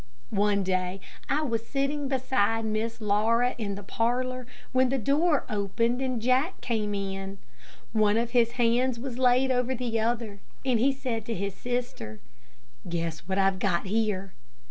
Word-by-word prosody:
One 205 -1 +2
day 185 0 -1 0.3
I 300 +2 +2
was 230 -5 -2
sitting 280 +1 -1
beside 225 -4 +1
Miss 220 +1 -2
Laura 225 +4 +2
in 200 -3 -2
the 205 - -8
parlor, 250 +4 -1 0.2
when 255 0 +3
the 270 - +1
door 290 +6 +2
opened 230 +5 0
and 255 -3 -1
Jack 255 - +1
came 210 -3 -1
in. 195 0 -4 0.6
One 215 -1 +3
of 235 0 0
his 235 -1 +3
hands 240 +1 +2
was 250 0 -5
laid 255 +1 +4
over 250 +1 +1
the 235 -2 -1
other, 225 -2 -1 0.3
and 250 -4 +3
he 270 +4 +4
said 250 -5 -3
to 230 - -1
his 200 0 -2
sister, 240 - -4 0.7
"Guess 165 -1 -3
what 190 0 -1
I've 195 -1 +3
got 185 -3 +1
here." 195 -2 -1
230 Hz, 160 wpm, -28 LUFS, 200-255 Hz, 0.7 s, laid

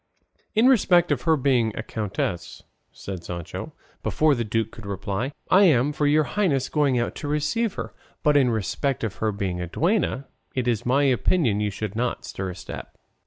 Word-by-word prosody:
"In 220 +3 +4
respect 180 - +4
of 135 -4 +1
her 160 - +5
being 125 -5 +1
a - - -3
countess," 95 -6 -4 0.3
said 95 -3 -7
Sancho, 85 -1 -6 0.3
before 155 -1 +2
the 120 -3 -1
duke 110 0 -1
could 110 -3 -10
reply, 100 +6 -3 0.2
"I 195 +2 +7
am 145 -3 +3
for 145 0 +1
your 155 +1 +4
highnesses 150 -7 0
going 145 -4 +2
out 120 - -1
to 145 - -5
receive 155 +10 0
her; - - -5 0.3
but 150 -1 +4
in 135 -3 +5
respect 120 +5 -1
of 110 -4 -3
her 110 -1 0
being 95 -3 -3
a 90 - -3
duenna, 165 - 0 0.3
it 125 -2 -1
is 120 -1 0
my 135 +3 +3
opinion 130 - +2
you 105 - +1
should 105 +1 -5
not 120 +2 -2
stir 95 -1 -4
a 90 - -6
step." - - -9
125 Hz, 190 wpm, -24 LUFS, 105-150 Hz, 0.3 s, I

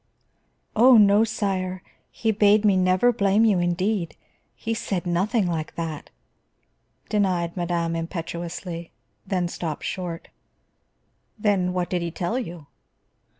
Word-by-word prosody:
"Oh, 245 +2 +7
no, 205 0 +6
sire. 190 -4 -2 0.3
He 225 - -1
bade 210 0 +4
me 200 -2 +5
never 185 +6 +3
blame 205 +1 +3
you, 205 -5 +3
indeed. 175 +1 -1 0.4
He 225 - -3
said 195 -5 -3
nothing 190 +5 +1
like 165 -3 -3
that," 160 -3 -5 1.0
denied 185 -5 0
madame 170 -2 -1
impetuously, 170 0 -5 0.4
then 185 -2 0
stopped 165 -3 -5
short. 175 -3 -5 1.1
"Then 200 -4 +1
what 180 -1 -1
did 180 -1 0
he 170 - -2
tell 180 +8 -2
you?" 170 - -7
185 Hz, 120 wpm, -24 LUFS, 170-205 Hz, 1.1 s, Oh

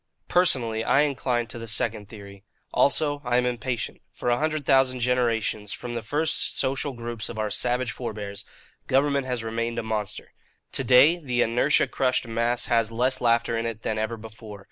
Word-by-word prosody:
"Personally, 120 -11 +2
I 140 - +4
incline 130 -5 0
to 120 - -8
the 115 - -7
second 105 -1 -2
theory. 100 -2 -12 0.3
Also, 145 0 +2
I 120 -1 +1
am 125 - +2
impatient. 120 -1 -3
For 120 - -2
a 120 - +2
hundred 155 -1 -1
thousand 130 -2 +3
generations, 115 -4 0
from 120 -1 -6
the 115 - -3
first 150 +8 0
social 135 +1 -1
groups 115 -2 -6
of 115 - -7
our 110 -1 -2
savage 125 +3 +1
forbears, 105 -5 -6 0.4
government 140 0 +2
has 125 -3 -2
remained 115 +1 -3
a - - -1
monster. 110 -2 -4 0.4
To 135 - 0
day, 130 +7 +6
the 125 -7 0
inertia 115 +2 +3
crushed 125 -2 0
mass 115 +1 0
has 115 -2 +1
less 125 +3 +1
laughter 115 -1 +2
in 115 0 -1
it 115 -1 -6
than 110 0 -1
ever 110 +1 -2
before. 110 -1 -11
120 Hz, 180 wpm, -25 LUFS, 110-130 Hz, 0.4 s, day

